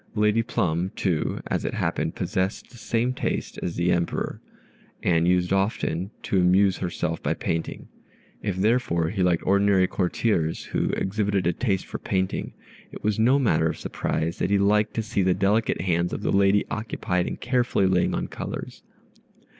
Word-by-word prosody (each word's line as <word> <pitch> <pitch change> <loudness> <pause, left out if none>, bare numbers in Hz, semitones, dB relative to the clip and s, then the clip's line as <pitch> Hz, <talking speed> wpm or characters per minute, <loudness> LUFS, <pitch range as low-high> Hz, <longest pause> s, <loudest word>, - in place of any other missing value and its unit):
Lady 105 +1 +3
Plum, 90 -6 -1
too, 85 -5 -1
as - - -1
it - - -3
happened, - - -1
possessed 95 +1 -2
the 125 - -14
same 115 +3 0
taste 130 - -3
as 85 - -3
the 85 +1 +1
Emperor, 85 -1 -1 0.6
and 85 -1 +3
used 90 0 +2
often 95 -3 0
to 95 - +1
amuse 95 +2 +4
herself 85 -2 -2
by - - 0
painting. 80 0 -3 0.5
If, 100 -4 -2
therefore, 95 -6 +1
he 95 +1 -2
liked 90 -2 +2
ordinary 100 -1 +4
courtiers 90 -3 0
who - - -1
exhibited 100 -1 0
a 85 - +2
taste 95 -2 -1
for - - -6
painting, 95 0 -2 0.4
it - - -10
was 105 0 0
no 125 +5 +5
matter 80 - +2
of - - -4
surprise 80 +2 -2
that - - 0
he 100 - +3
liked 105 +2 +2
to 115 - 0
see 105 -2 -1
the 90 -1 +2
delicate 100 +1 +1
hands 85 -1 0
of - - -4
the - - +1
lady 100 +1 +3
occupied 90 -5 -1
in - - -4
carefully 125 -5 +1
laying 95 -1 +2
on - - -2
colors. - - -6
95 Hz, 170 wpm, -25 LUFS, 90-105 Hz, 0.6 s, no